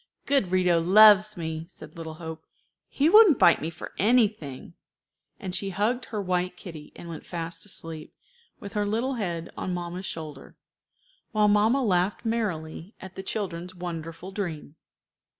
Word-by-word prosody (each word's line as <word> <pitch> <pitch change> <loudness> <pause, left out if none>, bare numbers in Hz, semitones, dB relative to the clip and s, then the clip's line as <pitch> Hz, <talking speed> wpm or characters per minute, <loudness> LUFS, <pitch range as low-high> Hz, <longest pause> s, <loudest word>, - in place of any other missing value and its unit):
"Good 275 -10 +2
Rito 180 -2 +3
loves 210 +3 +7
me," 160 -1 -4
said 190 - -13
little 160 -1 -7
Hope; 160 -1 -8 0.4
"he 285 - +2
wouldn't 400 - +8
bite 170 - +5
me 160 - -2
for 170 - -9
anything;" 210 - +1 0.7
and 185 - -5
she 195 +1 0
hugged 215 +7 0
her 215 - -4
white 180 -1 -1
kitty, 160 -5 -10
and 170 - -10
went 165 -2 -7
fast 170 +2 -5
asleep, 165 -5 -6 0.5
with 200 - -9
her 205 -1 0
little 235 +6 0
head 175 -8 -4
on 180 - -3
mamma's 175 +2 -5
shoulder, 155 -4 -8 0.8
while 210 -1 +4
mamma 215 +6 +3
laughed 190 0 +1
merrily 195 -5 -3
at 190 0 -10
the 190 - -6
children's 185 -3 -4
wonderful 170 0 -6
dream. 170 -7 -5
180 Hz, 150 wpm, -26 LUFS, 165-210 Hz, 0.8 s, wouldn't